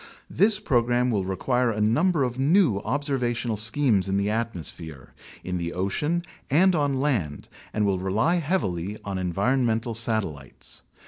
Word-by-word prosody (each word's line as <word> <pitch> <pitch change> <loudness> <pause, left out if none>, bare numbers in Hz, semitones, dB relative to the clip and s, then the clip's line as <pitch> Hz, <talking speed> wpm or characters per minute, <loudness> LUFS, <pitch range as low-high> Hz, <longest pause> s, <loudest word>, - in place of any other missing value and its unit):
This 205 0 +2
program 125 - +1
will 100 -4 -1
require 125 +6 0
a 110 -2 -2
num 120 - +2
ber 155 -6 +1
of 125 0 -3
new 145 - +3
observational 125 -2 -2
schemes 110 -2 +2
in 95 - 0
the 100 +1 0
atmosphere, 85 - -5 0.3
in 90 -1 -3
the 85 0 -4
ocean, 150 - -1 0.3
and 180 +7 +4
on 145 -4 0
land 110 - -1 0.2
and 105 -1 0
will 95 -2 0
rely 110 - +1
heavily 105 - -2
on 95 -2 -3
environmental 115 +5 0
satellites. 110 - -2
115 Hz, 145 wpm, -25 LUFS, 95-140 Hz, 0.3 s, and